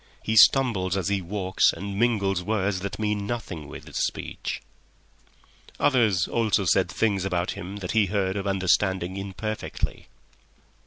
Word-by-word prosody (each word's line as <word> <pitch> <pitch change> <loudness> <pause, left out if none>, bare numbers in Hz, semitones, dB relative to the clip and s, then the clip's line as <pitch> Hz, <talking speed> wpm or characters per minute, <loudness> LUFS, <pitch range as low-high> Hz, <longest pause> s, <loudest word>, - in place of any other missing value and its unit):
He 110 - -1
stumbles 100 -7 +5
as 95 -1 -1
he 100 -1 0
walks 95 +1 +1
and 100 0 -6
mingles 100 -6 +1
words 100 0 0
that 100 +1 -5
mean 105 -2 -1
nothing 95 -10 -5
with - - -10
his - - -7
speech." - - -3 1.2
Others 110 -9 +3
also 110 -4 +1
said 90 +1 +3
things 100 -2 0
about 90 -2 -1
him 95 +3 -7
that 95 -3 -5
he 110 -3 +3
heard 95 -1 0
or 100 0 -3
understood 95 -1 +2
imperfectly. 100 +3 -4
100 Hz, 145 wpm, -25 LUFS, 95-105 Hz, 1.2 s, stumbles